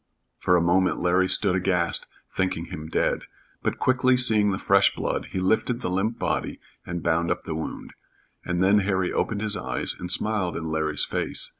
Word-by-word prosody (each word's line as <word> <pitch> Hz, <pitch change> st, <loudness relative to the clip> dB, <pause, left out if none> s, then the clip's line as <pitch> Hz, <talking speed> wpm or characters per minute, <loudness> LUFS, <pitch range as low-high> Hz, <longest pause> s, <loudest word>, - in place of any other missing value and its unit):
For 90 Hz, -, +2 dB
a 85 Hz, -, +3 dB
moment 90 Hz, +2 st, +2 dB
Larry 90 Hz, +1 st, +2 dB
stood 100 Hz, -3 st, +4 dB
aghast, 90 Hz, -2 st, 0 dB, 0.2 s
thinking 95 Hz, -3 st, -1 dB
him 80 Hz, -2 st, -7 dB
dead, -, -, 0 dB, 0.4 s
but -, -, -2 dB
quickly 130 Hz, 0 st, +2 dB
seeing 110 Hz, -4 st, +5 dB
the 95 Hz, -, -1 dB
fresh -, -, +3 dB
blood, -, -, -3 dB
he -, -, -4 dB
lifted 110 Hz, +6 st, 0 dB
the 90 Hz, -, -2 dB
limp 100 Hz, +5 st, -1 dB
body -, -, -2 dB, 0.2 s
and 85 Hz, -1 st, -5 dB
bound 85 Hz, 0 st, +1 dB
up -, -, -2 dB
the 80 Hz, -, -5 dB
wound, 80 Hz, 0 st, -6 dB, 0.5 s
and 90 Hz, +1 st, -1 dB
then 100 Hz, +2 st, +4 dB
Harry 95 Hz, -2 st, -1 dB
opened 105 Hz, -2 st, -1 dB
his 110 Hz, -1 st, -1 dB
eyes 65 Hz, -7 st, -2 dB
and 90 Hz, -, -6 dB
smiled 100 Hz, -1 st, +1 dB
in 85 Hz, -, -5 dB
Larry's 80 Hz, -1 st, 0 dB
face. -, -, -2 dB
95 Hz, 185 wpm, -25 LUFS, 85-105 Hz, 0.5 s, seeing